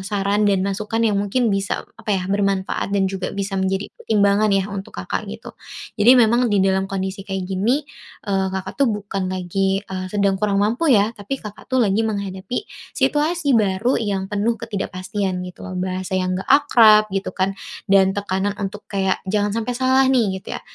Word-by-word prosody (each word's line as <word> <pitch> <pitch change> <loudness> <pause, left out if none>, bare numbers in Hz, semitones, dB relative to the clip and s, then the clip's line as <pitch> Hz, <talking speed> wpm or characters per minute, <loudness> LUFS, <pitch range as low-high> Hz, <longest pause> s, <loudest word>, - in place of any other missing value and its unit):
saran 200 +1 0
dan 195 -2 +2
masukan 215 +3 -1
yang 215 -2 +2
mungkin 215 +3 +1
bisa 195 0 -2 0.2
apa 225 - -15
ya? 185 - -3
Bermanfaat 195 -1 0
dan 200 -1 +2
juga 190 -1 -3
bisa 200 0 -3
menjadi 190 +1 -1
pertimbangan 205 0 +2
ya 195 -1 +2
untuk 195 -1 -7
Kakak 90 0 -4
gitu. 65 - -8 0.4
Jadi 220 +4 +5
memang 240 +2 +4
di 205 - +2
dalam 190 0 +1
kondisi 190 0 -3
kayak 195 -1 -4
gini, 215 +10 0 0.4
eee, 195 -1 +1
Kakak 190 0 -5
tuh 275 - +5
bukan 200 -2 -3
lagi, 190 +1 0
eee, 185 -1 -5
sedang 200 -1 +1
kurang 205 -2 +1
mampu 225 +11 +1
ya 215 -2 +4
tapi, 210 +6 -5
Kakak 210 0 -11
tuh 260 - -2
lagi 205 0 +2
menghadapi 200 - -3 0.3
situasi 295 +3 +1
baru 215 +2 +2
yang 195 -3 -2
penuh 210 +3 +1
ketidakpastian 195 -3 -3
gitu 180 -1 -10
loh. 185 - -6
Bahasa 185 +1 -3
yang 185 0 0
nggak 190 - -7
akrab, 230 -7 +6
gitu 195 0 -2
kan, 190 +1 0 0.4
dan 195 -1 +5
tekanan 200 0 -1
untuk 205 +1 -5
kayak 190 -1 0
jangan 205 +1 +1
sampe 230 +2 -2
salah 260 +1 +3
nih, 225 -8 +2
gitu - - -7
ya. - - -8
200 Hz, 180 wpm, -21 LUFS, 190-215 Hz, 0.4 s, akrab